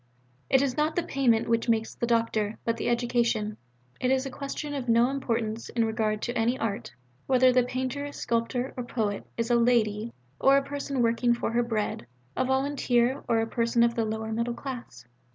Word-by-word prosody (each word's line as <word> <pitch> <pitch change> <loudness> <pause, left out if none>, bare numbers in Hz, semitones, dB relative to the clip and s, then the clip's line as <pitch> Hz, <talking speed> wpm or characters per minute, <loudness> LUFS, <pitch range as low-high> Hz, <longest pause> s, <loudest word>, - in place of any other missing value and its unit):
It 265 0 +4
is 260 -3 -1
not 305 +1 +1
the 350 - +1
payment 240 -7 +2
which 230 +1 +1
makes 225 -1 +1
the 235 - -2
doctor, 225 -2 +1
but 230 0 0
the - - -1
education. 235 -3 0 0.4
It 250 - +1
is 265 0 +2
a 270 - -5
question 285 +2 -5
of 265 -4 -4
no 235 +3 +4
importance 230 -4 -2
in 230 -1 +1
regard 220 -1 -1
to 240 - -2
any 235 +3 +1
art, 205 -9 -3 0.4
whether 255 -1 +5
the 250 - +5
painter, 260 +3 -3
sculptor, 245 +1 -2
or 250 - -3
poet 215 -4 -2
is 230 +1 -1
a - - +5
'lady' 230 -2 +2 0.3
or 275 +1 +5
a 275 - +2
person 280 -2 -2
working 235 +1 +2
for 235 - -2
her 240 +1 +2
bread, 215 - -2 0.3
a - - +1
volunteer, 265 -1 +1
or 225 -1 +3
a 225 - -1
person 235 0 +2
of 235 0 +3
the 230 -1 0
'lower 220 0 -3
middle 235 +2 -1
class.' 255 - -7
235 Hz, 195 wpm, -27 LUFS, 225-260 Hz, 0.4 s, whether